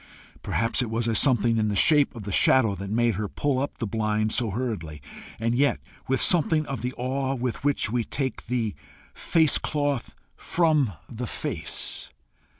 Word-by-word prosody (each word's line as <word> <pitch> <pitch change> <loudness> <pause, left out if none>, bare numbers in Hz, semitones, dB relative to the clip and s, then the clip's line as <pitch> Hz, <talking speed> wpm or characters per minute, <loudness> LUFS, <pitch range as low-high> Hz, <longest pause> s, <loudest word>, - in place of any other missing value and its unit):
Perhaps 115 +3 0
it 120 - -2
was 115 0 -1
something 120 -3 +3
in 110 - +1
the 105 - -1
shape 145 +4 +4
of 115 - -7
the 100 - -5
shadow 110 +2 +4
that 100 +1 -6
made 115 +2 +2
her 105 0 -2
pull 140 +4 -1
up 140 - -3
the 115 - -3
blind 110 0 0
so 120 -1 +1
hurriedly, 100 -9 -4 0.4
and 115 +1 0
yet 140 +3 +2 0.3
with 135 0 +1
something 160 -3 +4
of 135 -7 -5
the 125 +1 -2
awe 130 +2 -1
with 125 0 -3
which 145 -7 +1
we 120 -1 0
take 130 0 -4
"the 115 -3 -1 0.4
face 160 -3 +2
cloth 145 -4 -2 0.2
from 155 - +1
the 120 0 -6
face." - - -4
120 Hz, 170 wpm, -25 LUFS, 110-135 Hz, 0.4 s, shape